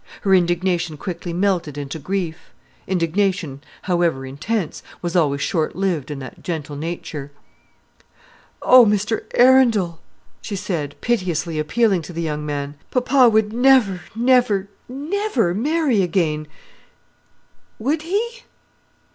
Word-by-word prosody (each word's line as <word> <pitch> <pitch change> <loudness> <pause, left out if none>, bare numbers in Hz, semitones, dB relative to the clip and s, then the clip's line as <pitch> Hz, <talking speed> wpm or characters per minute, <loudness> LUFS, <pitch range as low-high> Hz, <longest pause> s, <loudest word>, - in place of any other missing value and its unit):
Her 195 - +2
indignation 175 -2 +1
quickly 175 +1 -5
melted 175 -5 0
into 145 +2 -5
grief. 175 +1 -4 0.4
Indignation, 180 -4 0 0.2
however 170 -7 0
intense, 160 +8 -3 0.2
was 175 0 -4
always 145 -5 +2
short 160 -1 -1
lived 180 -8 -1
in 145 - -4
that 130 -3 -9
gentle 155 -4 -4
nature. 150 -2 -5 1.3
"Oh, 255 -1 +8
Mr 210 +1 0
Arundel!" 235 -10 +4 0.4
she 205 - -5
said, 170 -7 -3
piteously 175 -8 -1
appealing 195 +4 +2
to 170 +3 -9
the 170 0 -3
young 150 -2 -3
man, 145 -1 -4
"papa 255 0 +4
would 215 -1 +2
never, 245 -7 +4
never, 235 -5 +3 0.2
never 280 - -1
marry 275 - +1
again, 165 -4 0 1.3
would 290 +8 -1
he?" 450 +8 -2
185 Hz, 115 wpm, -21 LUFS, 160-230 Hz, 1.3 s, Oh